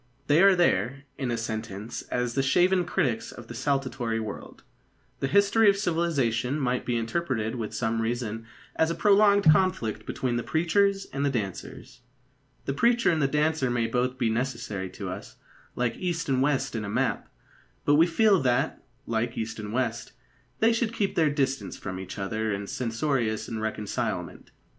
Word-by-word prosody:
They 150 +4 +4
are 195 -1 +7
there, 140 -6 +1 0.2
in 130 -3 -1
a 120 - -1
sentence, 110 -1 -5
as 125 -1 -1
the 135 - +1
shaven 180 +6 +3
critics 140 -11 -1
of 120 -2 -11
a - - -5
saltatory 130 -3 -1
world. 110 -2 -7 0.6
The 135 - 0
history 200 +7 +4
of 200 - +3
civilisation 150 - 0
might 125 -2 -1
be 120 -1 +1
interpreted 115 -2 -1
with 115 -4 -4
some 115 0 -1
reason 115 -1 -3 0.3
as 160 - +2
a 165 - -1
prolonged 205 0 +5
conflict 155 - 0
between 125 -2 -1
the - - 0
preachers 195 +7 +1
and 140 +1 -1
the 140 - +2
dancers. 105 -2 -5 0.6
The 140 - -1
preacher 235 - +3
and 160 -2 0
the 140 - +3
dancer 150 -1 +1
may 120 -1 +1
both 125 +3 -1
be 120 -3 +1
necessary 115 -6 -3
to - - -7
us, - - -8 0.4
like 125 -1 0
east 175 -3 -2
and 130 -2 +1
west 135 -2 0
in 110 - -2
a 100 - -4
map; - - -1 0.6
but 145 - +4
we 160 +4 +6
feel 200 +1 +4
that, 125 -2 0 0.2
like 115 +1 -2
east 110 0 -4
and 105 -1 -6
west, 120 -1 -2 0.5
they 225 +1 +5
should 230 -1 -1
keep 200 -3 0
their 160 -3 +3
distance 135 -2 -1
from 95 -2 -6
each 95 +1 -7
other 110 +2 -2
in 100 0 -3
censorious 115 -1 -1
irreconcilement. 110 -2 -3
130 Hz, 170 wpm, -27 LUFS, 115-160 Hz, 0.6 s, are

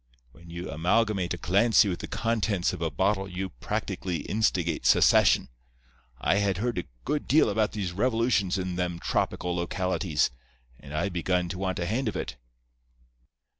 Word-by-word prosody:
When 85 +5 -16
you 85 +1 -6
amalgamate 90 +3 +1
a - - -10
Clancy 105 +5 +4
with 90 -3 -2
the - - -6
contents 110 -5 0
of - - -6
a 80 - 0
bottle 95 +6 0
you 95 +1 -4
practically 85 +5 -3
instigate 90 -4 0
secession. - - +5 0.7
I 95 - +2
had 100 -3 +1
heard 115 -1 -1
a - - -5 0.2
good 150 +2 -1
deal 140 -5 +4
about 105 +1 0
these 100 -4 -3
revolutions 110 -2 +1
in 90 -1 -3
them 90 -1 -1
tropical 90 +1 -1
localities, 90 -3 0 0.5
and 70 - -12
I 75 +6 -1
begun 90 0 -1
to 90 - -5
want 95 -1 -2
a 85 - -2
hand 115 +6 -1
in 95 - -4
it. 65 - -4
95 Hz, 165 wpm, -27 LUFS, 85-105 Hz, 0.7 s, secession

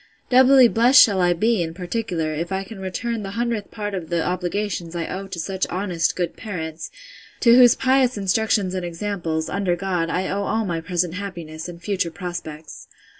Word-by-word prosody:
Doubly 260 0 +7
blest 240 +4 +5
shall 200 -4 +6
I 175 0 +3
be, 220 +3 +1
in 165 -1 -4
particular, 180 -4 -3
if 170 +4 -4
I 190 0 -1
can 195 +1 -10
return 220 +5 -3
the 195 - -5
hundredth 235 -3 -2
part 205 -2 -5
of 180 -4 -5
the 170 -2 0
obligations 180 -1 -3
I 170 -1 -2
owe 195 +1 -5
to 190 -2 -7
such 190 +3 -2
honest 180 -3 -1
good 175 -2 -2
parents, 160 -7 -6 0.5
to 235 -1 +6
whose 245 -2 +7
pious 260 -2 +2
instructions 200 -1 +1
and 185 -1 -3
examples, 170 -2 -3
under 195 -2 0
God, 175 -2 -2
I 185 +2 -1
owe 200 +1 -2
all 220 +1 0
my 170 -3 -2
present 175 0 -1
happiness, 175 -4 -6
and 170 -1 -9
future 185 -1 -1
prospects. 160 -4 -8
185 Hz, 185 wpm, -22 LUFS, 170-210 Hz, 0.5 s, Doubly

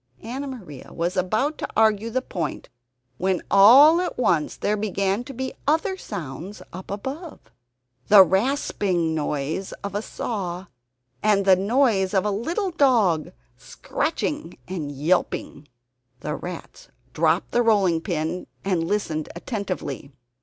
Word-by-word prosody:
Anna 260 +5 -5
Maria 190 - -9
was 170 +3 -2
about 215 +12 0
to - - -3
argue 220 0 +3
the 255 +3 -1
point 165 - -4 0.5
when 185 -1 0
all 270 - +8
at 360 - -3
once 165 -11 +1
there 210 - 0
began 200 +1 -1
to 275 - -8
be 260 0 -4
other 325 +6 +2
sounds 185 - -7
up 185 +2 -9
above 270 - -6 0.7
the 200 -2 +9
rasping 190 - 0
noise 150 +4 -2
of 200 -1 -4
a 205 - -1
saw, 190 -6 -4 0.6
and 200 -2 +3
the 190 -1 +7
noise 200 -1 +2
of 190 - +2
a 210 - +1
little 335 - -2
dog, 230 - +2 0.3
scratching - - -3
and 165 -6 -4
yelping! 145 -1 -1 0.5
The 150 - -3
rats 180 - -8 0.3
dropped - - +1
the 240 - +3
rolling 195 -8 +3
pin 170 0 -3 0.2
and 185 -4 +1
listened 160 -7 -2
attentively. 185 - -5
200 Hz, 130 wpm, -24 LUFS, 175-240 Hz, 0.7 s, the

